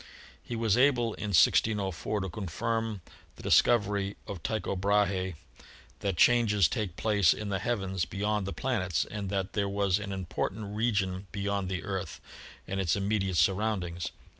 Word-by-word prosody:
He 120 - -5
was 115 -2 +2
able 125 -4 +3
in 105 - -5
1604 100 +1 +2
to 95 - -3
confirm 110 +3 -3 0.3
the - - -13
discovery 105 -4 +3
of 95 -5 -7
Tycho 105 -1 -2
Brahe 95 -2 +1 0.6
that 95 -4 -2
changes 110 -5 +5
take 100 -6 -3
place 100 -6 +3
in 105 -1 -5
the 95 -1 -1
heavens 95 -5 -1
be - - -9
yond 105 -1 0
the - - -3
planets 100 -10 -1
and 100 -2 -5
that 95 0 -2
there 100 -2 0
was 100 -1 +1
an 105 -1 -5
important 95 +2 -4
region 100 -4 0
beyond 100 -2 -2
the 95 -1 -3
Earth 95 -2 -4 0.5
and 95 - -3
its 85 -3 +1
immediate 100 -2 0
surroundings. 95 -4 0
100 Hz, 155 wpm, -29 LUFS, 95-105 Hz, 0.6 s, changes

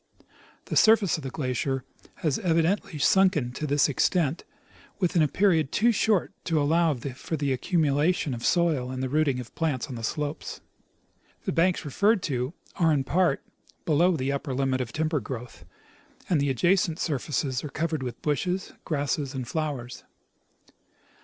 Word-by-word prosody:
The - - -4
surface 220 -6 +5
of 155 - -8
the 135 - -4
glacier 130 -1 -2 0.4
has 155 -5 +1
evidently 165 0 +1
sunken 155 -4 +3
to 150 +5 -4
this 145 0 +3
extent 155 +2 +1 0.6
Avithin 180 -3 +2
a 155 - +4
period 160 -3 +2
too 235 +3 +3
short 215 -3 +1
to 165 -3 +1
allow 165 +3 +3
of 135 -6 -2
the 140 - -4
accumula 145 +3 0
tion 145 - -2
of 120 -1 -6
soil 160 -8 +2
and 130 0 -4
the 130 - -1
rooting 145 -2 +1
of 125 - -9
plants 150 -7 -1
on 130 - -8
the 115 -2 -6
slopes. 150 +4 -3 0.9
The - - 0
banks 175 0 +1
referred 200 - +2
to 130 0 -2 0.2
are 165 -2 +3
in 145 -3 +2
part 170 0 +1 0.4
below 170 +3 +3
the 135 0 -1
upper 140 -1 -3
limit 130 -1 0
of 120 -2 -4
timber 155 +3 0
growth, 125 -2 -8 0.6
and 160 -5 +2
the 140 - +1
adjacent 170 +5 +2
surfaces 140 -4 -2
are 150 - -5
covered 155 +1 -2
with 125 -2 -6
bushes, 180 +5 -1
grasses', 145 -2 -2
and 130 -2 -4
flowers. 140 -5 -4
150 Hz, 160 wpm, -26 LUFS, 130-170 Hz, 0.9 s, surface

